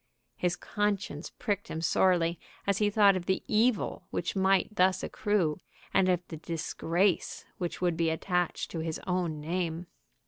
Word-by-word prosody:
His 180 0 0
conscience 205 -7 -2
pricked 205 -4 -2
him 160 - -4
sorely 170 +1 +2 0.3
as 200 -1 +1
he 210 -1 +3
thought 205 -2 +5
of 175 -2 -4
the 190 - +1
evil 220 +1 +1
which 170 - -2
might 195 +1 +2
thus 185 0 +3
accrue, 185 -8 0 0.3
and 185 -1 +4
of 180 -1 +1
the 160 - -6
disgrace 170 +3 -1
which 175 0 -3
would 175 -2 +1
be 165 0 +2
attached 180 +2 -1
to 165 - -4
his 160 0 -3
own 180 -4 -1
name. 170 +2 -2
180 Hz, 160 wpm, -30 LUFS, 165-195 Hz, 0.3 s, thought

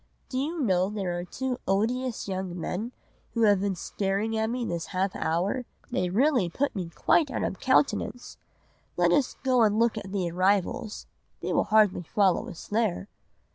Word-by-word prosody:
Do 255 - -2
you 320 +5 -2
know 190 -7 +2
there 195 -4 -2
are - - -4
two 255 +7 -3
odious 230 +6 0
young 185 -2 -4
men 210 +8 -3 0.4
who 230 - +2
have 205 -3 +5
been 200 -1 0
staring 200 +5 -2
at 220 0 0
me 245 0 -2
this 170 -5 -3
half 190 +1 -1
hour. 185 +10 0 0.3
They 180 -1 0
really 240 - +2
put 280 +10 -1
me 180 -4 -3
quite 290 - +2
out - - -2
of 190 - -3
countenance! 260 -1 +1 0.6
Let - - +4
us 285 -4 +2
go 255 -2 +3
and 215 -1 +4
look 230 -1 +2
at 195 -2 -9
the 185 -4 -1
arrivals, 205 +6 0 0.4
they - - -2
will - - +2
hardly 215 -4 +4
follow 190 +2 +1
us 165 - -10
there. 210 -2 0
205 Hz, 175 wpm, -27 LUFS, 185-245 Hz, 0.6 s, have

